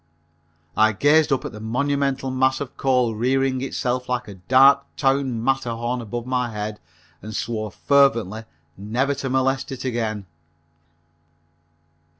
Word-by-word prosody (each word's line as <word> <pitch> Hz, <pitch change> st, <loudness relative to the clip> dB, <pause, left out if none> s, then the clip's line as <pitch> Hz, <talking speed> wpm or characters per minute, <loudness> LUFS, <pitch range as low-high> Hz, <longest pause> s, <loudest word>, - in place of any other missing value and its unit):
I 110 Hz, 0 st, +4 dB
gazed 150 Hz, +7 st, +3 dB
up 135 Hz, -, 0 dB
at -, -, -5 dB
the 110 Hz, -, -10 dB
monumental 135 Hz, +3 st, -1 dB
mass 130 Hz, 0 st, +1 dB
of 140 Hz, -3 st, -6 dB
coal 125 Hz, -4 st, +1 dB
rearing 130 Hz, +3 st, 0 dB
itself 125 Hz, -1 st, -2 dB
like 125 Hz, -1 st, -2 dB
a 100 Hz, -, -8 dB
dark 130 Hz, +9 st, +5 dB
town 135 Hz, -4 st, 0 dB
Matterhorn 120 Hz, -2 st, -1 dB
above 120 Hz, +1 st, -5 dB
my 125 Hz, -1 st, -1 dB
head 105 Hz, -1 st, -5 dB, 0.4 s
and 110 Hz, +2 st, -8 dB
swore 110 Hz, -2 st, -3 dB
fervently 115 Hz, -5 st, +2 dB, 0.3 s
never 120 Hz, +8 st, -1 dB
to 135 Hz, -1 st, -4 dB
molest 130 Hz, +1 st, 0 dB
it 130 Hz, 0 st, -6 dB
again. 110 Hz, -5 st, -2 dB
125 Hz, 135 wpm, -22 LUFS, 110-135 Hz, 0.4 s, dark